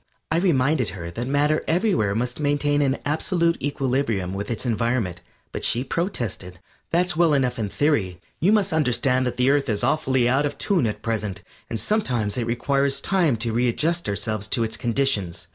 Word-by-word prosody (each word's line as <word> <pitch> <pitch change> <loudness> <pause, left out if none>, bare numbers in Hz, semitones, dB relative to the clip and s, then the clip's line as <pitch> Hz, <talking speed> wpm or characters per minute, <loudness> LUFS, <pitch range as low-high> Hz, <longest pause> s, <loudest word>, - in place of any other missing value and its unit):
I 160 - +2
reminded 150 - +2
her 85 -1 -6
that 120 +8 -4
matter 145 +3 +1
everywhere 175 - +1
must 120 +3 -2
maintain 145 0 +1
an 135 -1 +1
absolute 165 +3 0
equilibrium 130 -9 -1
with 100 +1 -4
its 120 +1 -3
environment, 115 -6 -1 0.3
but - - -5
she 120 - +2
protested. 120 - -3 0.3
"That's 175 +1 +1
well 165 -2 +4
enough 125 -3 0
in 105 -2 -2
theory; 100 - 0 0.2
you 185 +6 +3
must 210 -6 +2
understand 130 -3 +2
that 125 - -4
the 125 +2 +3
Earth 140 -2 +1
is 105 +1 -1
awfully 130 -2 +2
out 135 +4 +2
of 145 - -7
tune 180 - +1
at 105 - -5
present, 105 -4 -3 0.3
and 115 - -2
sometimes 120 - 0
it 120 -2 -2
requires 135 +3 +1
time 175 -9 +1
to 115 0 -2
readjust 125 +7 +1
ourselves 105 +1 -2
to 120 - 0
its 110 0 -2
conditions." 115 -8 -1
130 Hz, 180 wpm, -23 LUFS, 110-150 Hz, 0.3 s, well